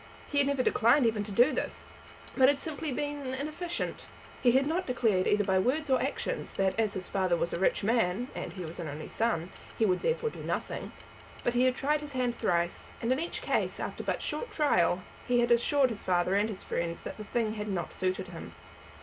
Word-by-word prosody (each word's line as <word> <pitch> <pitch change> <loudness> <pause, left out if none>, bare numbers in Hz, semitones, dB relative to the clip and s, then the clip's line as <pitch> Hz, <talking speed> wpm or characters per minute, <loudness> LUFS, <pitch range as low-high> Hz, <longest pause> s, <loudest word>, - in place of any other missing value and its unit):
He 285 - +2
had 280 - +3
never 280 -2 +1
declined 240 +4 +4
even 220 -2 +1
to 210 - -7
do 245 +8 +5
this, - - -3 0.5
but 260 -1 +6
had 285 - +3
simply 310 0 -3
been 290 -1 -3
inefficient. 310 +5 -4 0.3
He 245 -2 +5
had 265 +2 +4
not 335 +5 -1
declared 225 -7 +2
either 205 0 +3
by 190 -1 +2
words 280 +7 0
or 260 - +4
actions - - -3
that 190 -1 +2
as 215 -2 +1
his 185 -1 -4
father 185 -3 +1
was 170 - -1
a - - -2
rich 190 - +2
man, 225 0 +1
and - - -5
as - - -13
he 180 - -4
was 160 +2 -8
an 170 - -4
only 150 +1 -6
son, 190 -7 0 0.3
he 225 - +3
would 185 -3 +2
therefore 475 -1 0
do - - -9
nothing. - - -3 0.5
But 240 - +1
he 245 +1 +3
had 255 -1 +3
tried 295 +3 +1
his 295 -1 -8
hand 250 -2 0
thrice, 175 -5 -1
and 230 - -1
in 260 - +2
each 335 +2 -4
case, - - 0
after - - -4
but - - -2
short 485 - -3
trial, 180 - +2 0.2
had 240 -1 +3
assured 255 +2 +4
his 220 - -4
father 180 0 +1
and 205 +2 +2
his 200 -3 -5
friends 170 0 -3
that - - -6
the 215 - -6
thing 220 +1 -1
had 210 -1 -4
not 180 -5 -3
suited 185 0 -2
him. - - -9
235 Hz, 225 wpm, -30 LUFS, 190-275 Hz, 0.5 s, but